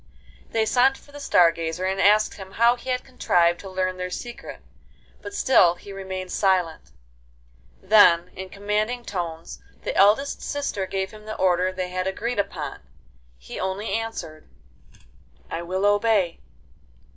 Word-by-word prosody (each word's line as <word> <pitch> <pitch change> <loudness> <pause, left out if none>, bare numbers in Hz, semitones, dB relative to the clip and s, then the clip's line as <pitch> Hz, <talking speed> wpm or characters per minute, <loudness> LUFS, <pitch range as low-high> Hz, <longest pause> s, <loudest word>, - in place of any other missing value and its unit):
They 225 -1 +1
sent 255 +4 +3
for 285 - -19
the 290 - -10
Star 175 -11 +4
Gazer, 165 +2 -4
and 190 +1 0
asked 210 +2 +4
him 190 -1 -11
how 235 +2 +4
he 250 +1 -10
had 250 0 -1
contrived 175 -9 +1
to 195 - -9
learn 185 0 -2
their 180 0 -4
secret; 240 +6 -8 0.6
but - - -7
still 185 - +4
he 200 +3 -11
remained 190 -1 -6
silent. 180 - 0 0.9
Then, 185 -4 +6
in 190 0 -7
commanding 210 +5 -2
tones, 170 -4 -5 0.2
the - - -3
eldest 215 +9 +3
sister 280 -10 -3
gave 190 0 -3
him 215 0 -13
the 215 0 -5
order 185 0 +2
they 185 -1 -4
had 185 +1 -2
agreed 220 +4 -2
upon. 200 - -3 0.6
He - - -9
only 190 +3 -3
answered: 180 -9 -5 1.0
'I 165 - -3
will 185 +3 -2
obey. 205 -4 +2
190 Hz, 150 wpm, -24 LUFS, 180-220 Hz, 1.0 s, Then